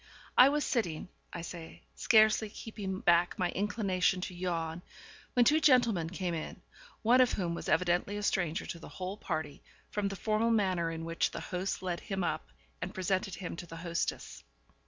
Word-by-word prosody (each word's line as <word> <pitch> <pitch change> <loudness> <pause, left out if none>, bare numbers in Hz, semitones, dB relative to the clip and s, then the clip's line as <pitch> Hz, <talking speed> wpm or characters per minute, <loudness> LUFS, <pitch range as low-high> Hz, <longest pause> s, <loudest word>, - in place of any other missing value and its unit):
I 255 - +9
was 295 +1 0
sitting, 180 - -1 0.2
I 170 - -5
say, 165 -1 -9
scarcely 215 -1 +4
keeping 205 -3 -6
back 175 0 +3
my 180 -1 0
inclination 195 -2 +1
to 185 - -4
yawn, 170 -2 -3 0.5
when 245 -2 +5
two 305 +4 +5
gentlemen 235 - +4
came 180 -1 -3
in, 160 -2 -5 0.4
one 245 +3 +6
of 250 - +3
whom 175 -4 -1
was - - -5
evidently 180 +3 +2
a 205 - -4
stranger 180 -3 0
to 170 - -6
the - - -10
whole 185 +1 -5
party, 155 -8 -4 0.3
from 205 -1 0
the 195 - -4
formal 215 +3 +1
manner 185 -7 +2
in 165 0 -5
which 165 0 0
the - - -6
host 185 +1 -3
led 175 -2 -2
him 195 -4 -3
up, 155 -2 -2 0.3
and 180 - -4
presented 190 0 -1
him 180 -3 -5
to 175 - -7
the 165 - -9
hostess. 170 0 -3
185 Hz, 180 wpm, -31 LUFS, 170-210 Hz, 0.5 s, I